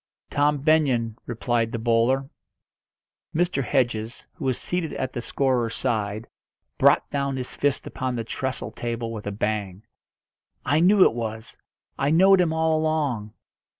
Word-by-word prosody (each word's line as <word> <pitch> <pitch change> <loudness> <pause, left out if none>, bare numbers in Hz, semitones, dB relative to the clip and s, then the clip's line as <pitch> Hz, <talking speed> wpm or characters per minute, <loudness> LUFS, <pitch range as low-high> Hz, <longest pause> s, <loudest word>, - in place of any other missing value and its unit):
"Tom 145 +1 +2
Benyon," 135 -7 +2
replied 115 -1 -1
the 115 - -2
bowler. 120 +4 +2 1.1
Mr. 170 -5 +1
Hedges, 120 -4 -1
who 165 -6 -7
was 130 -2 +1
seated 175 -3 -2
at 130 -1 -3
the 120 - -3
scorer's 125 -3 0
side, 110 -3 -2 0.5
brought - - +4
down 140 -1 -1
his 125 -1 -5
fist 145 -1 0
upon 130 -1 -3
the 115 - -2
trestle 130 +3 -4
table 115 -1 -4
with 105 -2 -7
a - - -1
bang. 100 -1 -3 0.8
"I 145 +4 +3
knew 190 +3 +6
it - - +4
was! 110 -1 -5 0.4
I 140 - +2
knowed 190 +4 +6
him 170 -3 +1
all 160 0 +1
along!" 145 -9 -1
130 Hz, 150 wpm, -24 LUFS, 115-150 Hz, 1.1 s, knew